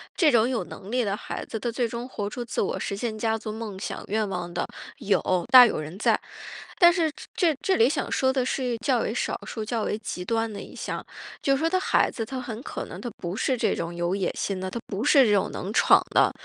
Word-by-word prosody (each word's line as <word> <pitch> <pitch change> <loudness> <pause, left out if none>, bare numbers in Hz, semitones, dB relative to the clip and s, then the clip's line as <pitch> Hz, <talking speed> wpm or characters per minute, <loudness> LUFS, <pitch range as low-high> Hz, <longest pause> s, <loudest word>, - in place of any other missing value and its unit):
这 320 -5 +4
种 235 -2 +4
有 250 -3 -1
能 195 - -10
力 250 +2 +1
的 200 -2 -1
孩 - - -6
子， 225 - -5
他 240 - -2
最 240 +1 0
终 235 +2 -5
活 205 -5 -4
出 245 +3 -5
自 - - -2
我 - - -1
实 200 - -3
现 220 +1 -3
家 225 0 +1
族 215 -1 -6
梦 215 -3 -6
想 190 - -5
愿 215 +1 0
望 180 -2 -4
的， 175 - -1 0.3
有 200 - +2 0.3
大 255 -1 +11
有 230 - 0
人 155 +5 -7
在。 - - +3 0.6
但 345 0 +9
是 330 -3 +1 0.2
这 340 -5 +3
这 380 - +2
里 230 +3 +5
想 285 -1 -2
说 260 0 +2
的 260 -2 0
是 250 -2 -1
较 255 -3 +3
为 220 - -1
少 245 - -1
数、 220 - -5
较 225 0 -1
为 210 - -1
极 180 -4 -5
端 225 +3 -1
的 205 - -6
一 - - -11
项， - - -5 0.4
就 275 - +1
是 - - -2
说 325 +2 +1
他 370 - +2
孩 - - +2
子 225 - -4
他 260 +3 -5
很 235 -2 -6
可 - - -5
能 - - -9
他 240 - -4
不 175 +1 -4
是 255 +4 0
这 - - +1
种 170 +1 -4
有 175 +2 -1
野 190 -3 0
心 195 -2 -2
的， 190 - -3
他 235 - -4
不 200 +3 -3
是 270 0 +6
这 210 - +3
种 200 - +2
能 190 - -5
闯 - - +6
的。 - - +4
225 Hz, 275 characters per minute, -26 LUFS, 200-255 Hz, 0.6 s, 大